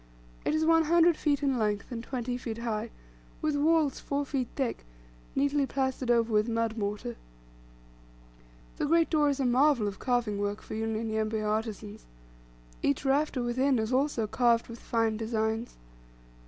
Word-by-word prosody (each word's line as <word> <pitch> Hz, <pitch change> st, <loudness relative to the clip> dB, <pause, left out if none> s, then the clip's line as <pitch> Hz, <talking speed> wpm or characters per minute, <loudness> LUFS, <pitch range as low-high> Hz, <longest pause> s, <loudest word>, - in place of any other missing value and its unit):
It -, -, +1 dB
is 315 Hz, 0 st, +1 dB
one 325 Hz, 0 st, +4 dB
hundred 340 Hz, +1 st, +5 dB
feet 290 Hz, -2 st, 0 dB
in 270 Hz, -3 st, +1 dB
length, 210 Hz, 0 st, -1 dB
and 230 Hz, -1 st, -5 dB
twenty 245 Hz, -1 st, -3 dB
feet 235 Hz, -3 st, -5 dB
high, 230 Hz, -1 st, -3 dB, 0.5 s
with 305 Hz, -1 st, 0 dB
walls 305 Hz, -1 st, +2 dB
four 285 Hz, 0 st, -2 dB
feet 265 Hz, -3 st, -2 dB
thick, 265 Hz, -4 st, -2 dB, 0.5 s
neatly 280 Hz, 0 st, +2 dB
plastered 265 Hz, -2 st, -2 dB
over 230 Hz, -1 st, +3 dB
with 215 Hz, +2 st, +3 dB
mud 230 Hz, -1 st, 0 dB
mortar. 205 Hz, -, -3 dB, 1.6 s
The -, -, -1 dB
great 330 Hz, +1 st, +3 dB
door 300 Hz, -2 st, +3 dB
is 280 Hz, 0 st, -1 dB
a 270 Hz, -, +1 dB
marvel 250 Hz, -2 st, +3 dB
of 200 Hz, -, -5 dB
carving 240 Hz, -5 st, 0 dB
work 205 Hz, +1 st, -2 dB
for -, -, -8 dB
Unyanyembe 220 Hz, 0 st, -1 dB
artisans. 215 Hz, 0 st, -3 dB, 0.7 s
Each 140 Hz, -, 0 dB
rafter 275 Hz, -1 st, +1 dB
within 255 Hz, +2 st, +1 dB
is 220 Hz, +2 st, -1 dB
also 260 Hz, -4 st, +1 dB
carved 235 Hz, +1 st, +2 dB
with 230 Hz, 0 st, -8 dB
fine 225 Hz, -2 st, 0 dB
designs. 220 Hz, +1 st, -2 dB
240 Hz, 155 wpm, -29 LUFS, 220-280 Hz, 1.6 s, hundred